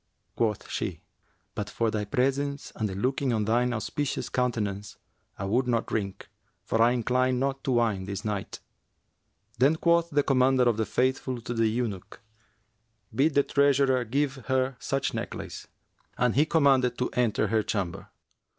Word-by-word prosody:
Quoth 110 -3 -1
she, - - -4 0.5
'But 105 0 -4
for 115 +1 0
thy 105 -1 -2
presence 140 +5 -1
and 110 -2 -1
the 95 - -5
looking 130 +5 0
on 110 -2 0
thine 120 +3 +2
auspicious 125 +5 -2
countenance, 105 -5 -2 0.4
I 100 - -4
would 120 +6 +1
not 115 -2 +1
drink, 100 -3 -4 0.4
for 115 - 0
I 115 - +6
incline 125 +1 +1
not 135 +1 -1
to 135 - +1
wine 110 -6 +1
this 100 +2 -5
night.' 105 -2 -4 1.0
Then 140 +5 +5
quoth 170 +1 +2
the 145 -2 +2
Commander 130 -1 +3
of 120 -3 +2
the 110 - -1
Faithful 130 0 0
to 120 - -4
the 115 -1 +2
eunuch, 110 -4 -3 0.9
'Bid 140 +6 +2
the 140 - +5
treasurer 140 -3 +3
give 135 +4 -1
her 130 0 +1
such 135 -1 -1
necklace;' - - -6 0.5
and 125 0 +2
he 150 +4 +3
commanded 135 -6 +3
to 125 - -1
enter 110 -4 +1
her 110 0 +2
chamber. 95 -5 -3
125 Hz, 160 wpm, -27 LUFS, 110-135 Hz, 1.0 s, I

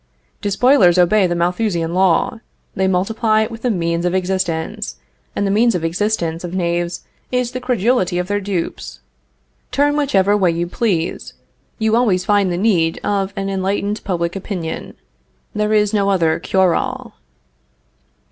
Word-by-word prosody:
Despoilers 200 -3 +4
obey 185 +2 +4
the 175 - -1
Malthusian 175 -1 -1
law; 190 +7 +2 0.3
they 190 0 0
multiply 215 +4 +1
with 225 0 -8
the 250 - 0
means 170 -4 -1
of 180 +1 0
existence, 180 - -2 0.4
and 200 - 0
the 195 - 0
means 230 +2 +3
of 170 - -2
existence 170 -1 -1
of 175 +1 -5
knaves 175 -1 -1 0.3
is 250 -1 0
the 255 - -4
credulity 240 -6 +1
of 180 0 -2
their 205 +1 -1
dupes. 165 - -4 0.7
Turn 290 +1 +2
whichever 205 -9 +2
way 190 -4 +3
you 170 +1 -1
please, 175 -3 -2 0.4
you 220 -1 +1
always 210 -7 +2
find 205 -3 +2
the 175 - -1
need 175 -5 +1
of 200 -1 -1
an 195 0 -3
enlightened 195 +2 -2
public 170 -2 -2
opinion. 180 -4 -5 0.6
There 210 0 0
is 210 -1 +2
no 200 -1 +2
other 165 -5 +2
cure 185 0 +2
all. - - -3
190 Hz, 150 wpm, -18 LUFS, 175-215 Hz, 0.7 s, Despoilers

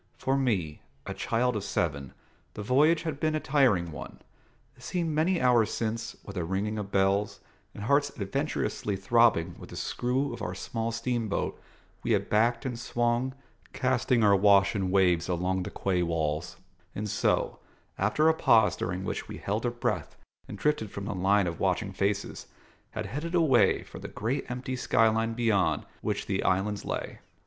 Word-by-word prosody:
For 135 - 0
me, 100 - -1 0.2
a - - -4
child 125 +1 0
of 105 - -2
seven, 70 -9 -2 0.4
the 105 - -5
voyage 150 +8 +3
had 155 -4 -4
been 155 0 +1
a - - +1
tiring 125 - +2
one: - - -9 0.6
it - - -20
seemed 170 -3 -2
many 165 +4 +2
hours 120 -4 +3
since, 115 0 -3
with 100 - -8
a 90 - -1
ringing 100 +5 -2
of 100 -1 -5
bells, 100 +1 +1 0.4
and 105 - -7
hearts 140 +5 +3
adventurously 105 -1 -2
throbbing 95 -4 +3
with - - -11
the - - -9
screw 130 +3 -1
of - - -8
our 90 - -3
small 115 +4 -3
steamboat, 115 -2 -2 0.4
we - - +1
had - - -1
backed 115 +3 +2
and 125 -3 -3
swung, 120 +2 0 0.4
casting 130 -2 +1
our 100 -1 +6
wash 100 0 +5
in 95 -2 0
waves 90 -3 +3
along 90 +1 0
the 95 - -4
quay 95 -3 -1
walls, 85 0 -2 0.4
and 105 +1 -3
so, 105 0 0 0.4
after 105 +11 +2
a 160 - +6
pause 115 -8 +4
during 90 +1 -3
which - - -4
we - - -7
held 105 +4 -2
our - - 0
breath 120 - -2 0.3
and 105 - -7
drifted 150 -5 0
from 100 0 -6
the 105 - -3
line 95 +2 +2
of 85 -2 -4
watching - - 0
faces, 100 0 -2 0.4
had - - -5
headed 165 +5 -4
away 155 -8 +4
for - - -11
the - - -7
great 115 +6 -3
empty 125 +1 -4
sky 115 -2 +3
line 115 +1 0
beyond 110 -6 +1 0.2
which - - -2
the - - -1
islands 100 +2 0
lay. - - -4
110 Hz, 175 wpm, -28 LUFS, 95-125 Hz, 0.6 s, our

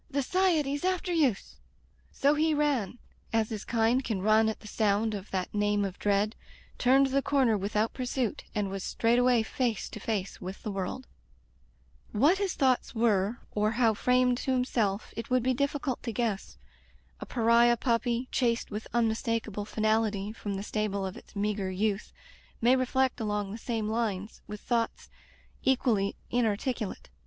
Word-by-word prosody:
The 280 -1 0
S'iety's 310 -4 +1
after 370 0 0
youse!'' 275 - 0 0.5
So 280 +1 +3
he 310 +1 +2
ran, 275 -8 0 0.3
as 225 -1 +1
his 215 -2 -4
kind 235 +3 +2
can 210 -6 -2
run 215 +1 +4
at 220 - -5
the 215 - -11
sound 215 +1 +1
of 200 -1 -6
that 185 -1 -3
name 205 -1 +1
of 195 -1 -6
dread, 205 +2 +1 0.4
turned 265 +2 +5
the 270 +1 +1
corner 265 -6 +2
without 210 +2 0
pursuit, 250 -2 -2
and 205 -2 -1
was 195 -1 -4
straightway 240 0 +3
face 235 -1 -1
to - - -8
face 200 -2 -3
with 185 +1 -7
the 210 - -3
world. 195 +6 -4 1.1
What 295 - +4
his 395 -2 -1
thoughts 260 -3 +1
were, 220 -1 +1
or 210 +1 +1
how 230 -1 +3
framed 250 +2 +2
to 265 - -1
himself, 230 -5 0
it 230 - -5
would 255 -1 +2
be 260 +1 +2
difficult 280 0 -1
to 235 - -3
guess. 220 -3 -2 0.6
A - - -7
pariah 235 0 +4
puppy, 235 +1 0
chased 235 -3 0
with 210 +1 -5
unmistakable 225 -2 0
finality 215 -1 0
from 205 -3 -4
the 195 - -4
stable 210 -2 -2
of 190 - -5
its - - -14
meagre 200 -1 -1
youth 200 +2 -1 0.5
may 245 +3 +5
reflect 260 0 +1
along 205 -2 -2
the 215 - -5
same 225 -2 -2
lines, 215 -3 -2
with 210 0 -7
thoughts 235 -1 -2 0.5
equally 235 -7 +1 0.2
inarticulate. 230 -1 -1
225 Hz, 160 wpm, -29 LUFS, 210-255 Hz, 1.1 s, turned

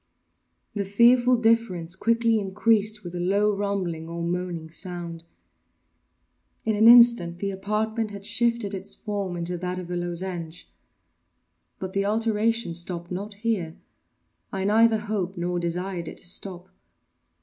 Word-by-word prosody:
The 205 - -1
fearful 240 +5 +5
difference 225 -7 +1
quickly 230 +2 +2
increased 210 +1 +1
with 175 -1 -7
a 175 - -4
low 200 +3 +2
rumbling 185 -5 -3
or 170 0 -4
moaning 170 -2 -3
sound. 170 -2 -6 1.4
In 220 -1 +1
an 220 +2 +5
instant 235 -8 +7
the 195 +2 -2
apartment 215 +3 -2
had 200 -1 -9
shifted 230 -1 +1
its 195 0 -4
form 200 -4 -4
into 175 +1 -3
that 180 +1 -3
of 180 -1 -6
a - - -2
lozenge. 175 -1 -4 1.1
But 190 0 -6
the 195 0 0
alteration 225 -1 +1
stopped 175 0 -2
not 200 +3 -5
here—I 195 -2 -6
neither 220 +2 +4
hoped 205 -3 -3
nor 175 0 -1
desired 175 0 -3
it - - -8
to - - -5
stop. 180 0 -4
195 Hz, 135 wpm, -25 LUFS, 175-220 Hz, 1.4 s, instant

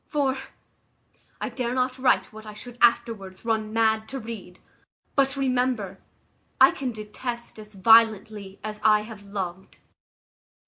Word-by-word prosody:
for 275 -3 +1 1.0
I - - -3
dare 250 -1 -3
not 255 0 0
write 255 -3 +2
what 220 0 -11
I 210 - -9
should 245 +2 -11
afterwards 230 -5 +1
run 220 -2 0
mad 220 -1 +1
to 270 - -4
read; 220 -6 -8 0.6
but 275 -1 +2
remember, 250 -7 0 0.6
I 265 +1 +8
can 260 -2 -3
detest 235 +2 -6
as 210 -1 -12
violently 215 -1 +4
as 215 0 -5
I 215 -1 +5
have 210 -2 -11
loved." 190 -2 -6
220 Hz, 135 wpm, -25 LUFS, 210-250 Hz, 1.0 s, I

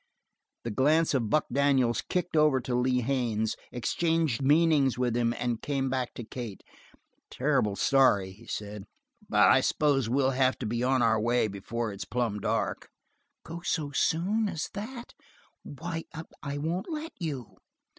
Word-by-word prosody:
The 115 - -3
glance 150 +8 +3
of 120 -6 0
Buck 155 +6 +2
Daniels 135 -3 +2
kicked 180 -2 -3
over 150 -3 +4
to 125 0 -4
Lee 125 +1 +2
Haines, 115 -4 0 0.2
exchanged 160 +2 0
meanings 145 -2 +3
with 125 -2 0
him, 120 -1 +2
and 120 -2 -2
came 135 -2 -1
back 130 -2 -2
to 120 - -6
Kate. 115 -3 -7 0.7
"Terrible 105 -2 +1
sorry," 100 -4 +3
he 105 +5 -16
said, 105 -1 -6 0.4
"but - - +5
I - - +5
s'pose 140 -6 +1
we'll 135 +1 +2
have 130 0 +2
to - - -5
be 115 +2 -1
on 130 -1 +2
our 110 -1 +3
way 120 +1 +2
before 105 +2 -4
it's 100 - -6
plumb 120 -4 -1
dark." - - -2 0.6
"Go 170 +1 -7
so 150 -4 -2
soon 195 +9 +1
as 165 -4 -4
that? 235 +4 -7 0.5
Why, 165 +3 -6 0.4
I 140 0 -4
won't 165 - -3
let 315 0 -4
you." 145 - -5
130 Hz, 155 wpm, -28 LUFS, 115-155 Hz, 0.7 s, but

